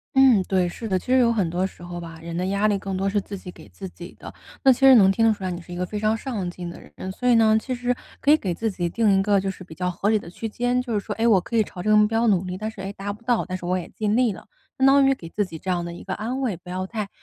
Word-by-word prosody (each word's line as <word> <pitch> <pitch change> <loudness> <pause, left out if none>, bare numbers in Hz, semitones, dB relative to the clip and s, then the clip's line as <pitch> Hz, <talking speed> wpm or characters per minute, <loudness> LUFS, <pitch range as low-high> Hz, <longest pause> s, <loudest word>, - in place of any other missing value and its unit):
嗯， 265 -6 +6
对， 185 -2 +1
是 225 +6 -6
的， 190 -3 +1
其 - - -8
实 260 - +5
有 235 -2 +4
很 205 -6 +1
多 180 +3 -1
时 175 - -15
候 175 0 -6
吧， 165 -1 -9
人 170 0 -6
的 180 +2 -1
压 200 +2 +1
力 205 -2 +1
更 195 -1 -4
多 195 +1 -1
是 200 +1 +1
自 200 +1 -7
己 185 -1 -9
给 - - -15
自 195 - -8
己 175 0 -11
的。 - - -9 0.3
那 265 - +7
其 - - -9
实 270 -1 +8
能 195 -4 +6
听 225 +4 +1
得 - - +5
出 205 -3 -4
来 185 - -2
你 175 0 -5
是 175 - -14
一 - - -5
个 180 +1 -2
非 210 +3 -5
常 215 +1 +1
上 220 -8 -4
进 175 0 -7
的 170 - -8 0.2
人， 190 - -6
所 250 +6 -1
以 240 - +6
呢， 220 -1 +5
其 255 +1 -3
实 245 0 -1 0.2
可 285 - +3
以 305 - +7
给 190 -11 -3
自 225 +5 -2
己 175 -2 -2
定 215 +2 +2
一 - - +3
个 200 0 +3
就 195 0 -2
是 185 - -11
比 165 -3 -12
较 180 +1 -1
合 195 +3 -1
理 220 - +4
的 205 - -8
区 220 +6 -6
间， 245 +3 0
就 245 -2 -5
是 210 - +1
说， - - -5
哎， 230 +1 +1
我 210 -5 +5
可 205 - -6
以 220 - +4
朝 180 -3 -9
这 215 - -1
个 - - +6
目 210 0 +5
标 225 +2 +1
努 195 -5 +3
力， 185 0 -5
但 215 +2 -4
是， 220 -3 -10
哎， 195 +1 -4
达 200 0 -5
不 210 - -15
到， 240 -1 +1
但 185 - -4
是 180 - -7
我 180 +1 +1
也 180 - -5
尽 210 -1 -1
力 240 -3 +3
了。 - - -13 0.3
相 265 - +5
当 275 0 +6
于 270 - +4
给 170 -11 -9
自 205 +4 -1
己 165 -4 -9
这 190 - -6
样 175 -1 0
的 170 - -6
一 175 - -10
个 - - -4
安 240 +5 -3
慰， 230 -9 -1
不 180 - -14
要 185 +1 -3
太 210 -1 -4
200 Hz, 375 characters per minute, -23 LUFS, 180-230 Hz, 0.3 s, 实